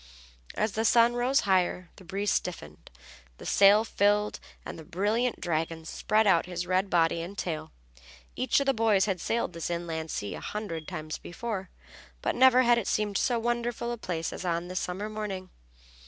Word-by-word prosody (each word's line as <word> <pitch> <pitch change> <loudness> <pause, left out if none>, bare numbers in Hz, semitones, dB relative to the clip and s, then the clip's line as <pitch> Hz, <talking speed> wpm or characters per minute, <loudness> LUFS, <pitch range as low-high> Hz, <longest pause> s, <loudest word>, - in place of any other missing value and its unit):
As 215 0 0
the 220 +3 -1
sun 235 +1 +5
rose 245 +3 +2
higher 180 -2 +1
the - - -13
breeze 200 +3 -2
stiffened, 75 - -4 0.5
the - - -11
sail 205 +2 +6
filled 210 0 +1 0.3
and - - -7
the - - -9
brilliant 215 +9 0
dragon 165 -1 -2
spread 215 +6 +1
out 180 -4 +3
his 180 -1 -4
red 185 +2 +1
body 165 -1 +2
and 185 +4 -7
tail. 160 - -4 0.6
Each 255 +1 +2
of 280 - -1
the 270 - +3
boys 220 -4 +3
had 190 -5 -2
sailed 230 -5 -1
this 165 0 -4
inland 165 -2 -3
sea 100 -7 -4
a - - -6
hundred 180 -7 -5
times 155 -4 -5
before, 195 0 -5 0.5
but - - +1
never 255 0 +6
had 240 -1 +4
it 210 - -5
seemed 205 -2 0
so 245 -2 +1
wonderful 240 0 -2
a 240 - -3
place 165 -5 -3
as - - -6
on 170 0 -2
this 185 0 -2
summer 190 +4 -4
morning. 210 -4 -5
195 Hz, 185 wpm, -28 LUFS, 170-225 Hz, 0.6 s, sail